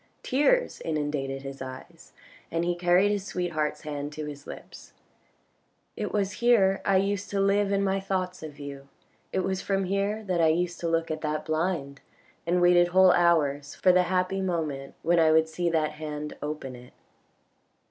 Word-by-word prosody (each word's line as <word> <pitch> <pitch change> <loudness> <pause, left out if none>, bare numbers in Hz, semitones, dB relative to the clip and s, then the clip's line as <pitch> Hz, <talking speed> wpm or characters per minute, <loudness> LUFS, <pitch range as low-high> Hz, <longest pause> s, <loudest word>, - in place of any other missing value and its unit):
Tears 295 - +2
inundated 145 -3 -2
his 135 -1 -8
eyes, 130 0 -10 0.4
and 165 +1 -1
he 175 - +1
carried 175 +3 +3
his 205 -2 -1
sweetheart's 170 -6 -2
hand 145 -1 -5
to 155 0 -5
his 145 -1 -9
lips: - - -11 1.0
"It - - -3
was 200 -2 0
here 205 -6 +4
I 195 - +3
used 200 +1 -1
to 200 - -1
live 200 +1 +2
in 200 0 +1
my 195 0 +1
thoughts 185 -2 -3
of 155 -2 -9
you, 140 -1 -8 0.4
it 190 - 0
was 190 0 -2
from 195 -1 0
here 200 +3 -1
that 180 -4 0
I 160 - +5
used 175 +2 0
to 170 - -2
look 165 0 0
at 155 0 -4
that 155 0 -2
blind, 155 -3 -2 0.5
and 175 +1 +2
waited 175 0 +5
whole 185 +1 +6
hours 145 -5 +2
for 185 - +4
the 180 0 +5
happy 185 +1 0
moment 155 -7 -3
when 170 +1 +3
I 160 -1 +5
would 160 0 +4
see 170 +2 -1
that 160 -2 +1
hand 150 -1 -6
open 145 -3 -5
it." 125 0 -14
170 Hz, 180 wpm, -27 LUFS, 150-190 Hz, 1.0 s, whole